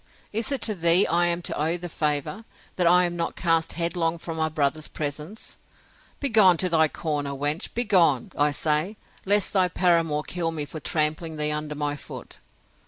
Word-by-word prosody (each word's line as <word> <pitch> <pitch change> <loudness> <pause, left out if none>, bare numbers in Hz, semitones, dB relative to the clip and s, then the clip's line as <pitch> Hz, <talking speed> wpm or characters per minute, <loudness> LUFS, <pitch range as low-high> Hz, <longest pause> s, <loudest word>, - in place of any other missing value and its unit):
Is 225 +5 0
it 275 - -1
to 215 - +2
thee 170 0 +5
I 175 +1 +2
am 175 0 -1
to - - -4
owe 160 +4 0
the 175 0 -7
favour, 150 +6 -2 0.3
that 180 -2 +1
I 180 +1 +5
am 175 0 -3
not 170 - -3
cast 165 -2 +1
headlong 170 0 -1
from 165 0 -7
my 160 -1 0
brother's 155 0 -1
presence? 150 +7 -6 0.6
Begone 215 -10 +5
to 185 +2 +1
thy 160 -2 +3
corner, 145 -3 -3
wench! 145 +4 -1
begone, 180 - +2
I 145 +1 +2
say, 155 +7 0 0.3
lest 205 0 +2
thy 185 -2 +3
paramour 165 -4 +1
kill 170 -1 -3
me 155 -3 -4
for 155 +2 -8
trampling 155 +1 -1
thee 150 0 -1
under 150 0 -4
my 145 0 -2
foot! - - -11
165 Hz, 180 wpm, -25 LUFS, 150-180 Hz, 0.6 s, thee